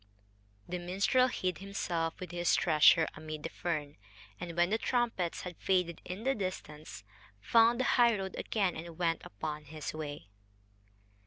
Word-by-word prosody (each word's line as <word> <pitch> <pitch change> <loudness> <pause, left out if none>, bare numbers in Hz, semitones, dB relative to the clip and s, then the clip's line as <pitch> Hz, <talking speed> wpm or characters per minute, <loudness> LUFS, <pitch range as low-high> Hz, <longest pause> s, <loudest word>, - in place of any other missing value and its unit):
The 180 0 -3
minstrel 195 +9 +2
hid 185 -8 -2
himself, 175 -4 -2
with 180 -3 -7
his 175 0 +2
treasure, 160 0 +5
amid 155 -1 -7
the 165 - -3
fern, 150 -4 -3 0.4
and, 170 -1 -6
when 175 +2 +3
the 220 - +2
trumpets 230 -10 0
had 180 -1 -7
faded 180 -3 0
in 185 +4 -6
the 270 +2 +2
distance, 150 - -6 0.4
found 230 - +4
the - - +2
highroad 225 -8 +3
again 195 -5 0
and 165 0 -8
went 165 -2 0
upon 150 +9 -5
his 155 0 -6
way. 145 - -6
175 Hz, 150 wpm, -32 LUFS, 155-195 Hz, 0.4 s, treasure